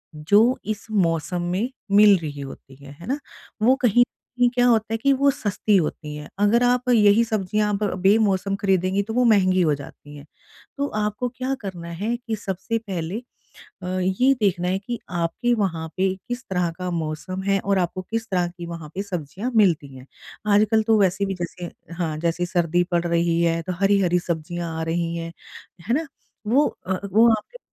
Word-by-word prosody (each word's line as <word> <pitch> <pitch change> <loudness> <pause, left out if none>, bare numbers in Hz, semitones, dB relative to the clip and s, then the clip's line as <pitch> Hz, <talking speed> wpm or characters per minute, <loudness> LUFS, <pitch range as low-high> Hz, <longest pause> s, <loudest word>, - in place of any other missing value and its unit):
जो 205 +11 +3
इस 215 0 -4
मौसम 175 -3 0
में 205 +7 -1 0.3
मिल 205 -1 +7
रही 150 -4 -6
होती 135 0 -10
है। 140 - -11
है 170 - -10
ना? 275 +4 -1 0.4
वो 250 +4 +5
कहीं 245 -1 +4
न - - +9 0.3
कहीं 245 0 +4
क्या 245 0 +4
होता 225 -2 +2
है - - +1
कि 275 +5 +2
वो 280 0 +5
सस्ती 210 -5 0
होती 150 -4 -1
है। 150 0 -8
अगर 210 +4 +4
आप 250 0 +2
यही 215 -1 +5
सब्ज़ियाँ 210 -1 0
अब 200 +1 -1 0.2
बेमौसम 195 -1 +3
खरीदेंगी, 190 0 +2
तो 220 +2 -6
वो 250 +2 +3
महँगी 185 -5 +4
हो 155 -4 +3
जाती 145 +1 -12
हैं। 145 0 -11 0.5
तो 280 +1 0
आपको 210 +4 -1
क्या 255 +2 -3
करना 180 -4 -6
है 230 +3 0
कि 235 -2 -4
सबसे 200 +2 -3
पहले 190 -4 -4 0.7
अ, - - -5
ये 190 +9 +3
देखना 180 -4 +1
है 190 +1 0
कि 235 +4 -5
आपके 175 +8 -1
वहाँ 175 -7 -1
पे 190 0 +1
किस 245 +1 -4
तरह 180 -2 0
का 180 0 -3
मौसम 170 +3 -4
है 195 0 +2
और 200 0 +1
आपको 185 +1 -2
किस 225 0 -2
तरह 180 -2 +1
की 175 0 -9
वहाँ 165 -2 -7
पे 195 - -2
सब्ज़ियाँ 185 - -4
मिलती 165 -10 +3
हैं। 130 0 -12 0.5
आजकल 215 +1 +4
तो 220 0 +3
वैसे 195 +1 +2
भी 195 - -2
जैसे 175 0 -6 0.2
हाँ, 165 -3 -2
जैसे 170 +2 -1
सर्दी 175 -1 +1
पड़ 175 0 +2
रही 170 0 +1
है, 165 0 +1
तो 185 - -4
हरी-हरी 195 -3 +3
सब्ज़ियाँ 170 -1 -4
आ - - -1
रही 165 +1 -1
हैं। 165 0 -5 0.6
है 235 - +3
ना? 315 +3 -1 0.4
वो 265 +7 +4 0.2
अ, 185 0 -1
वो 225 +4 +6
आपके - - -11
190 Hz, 195 wpm, -23 LUFS, 170-220 Hz, 0.7 s, न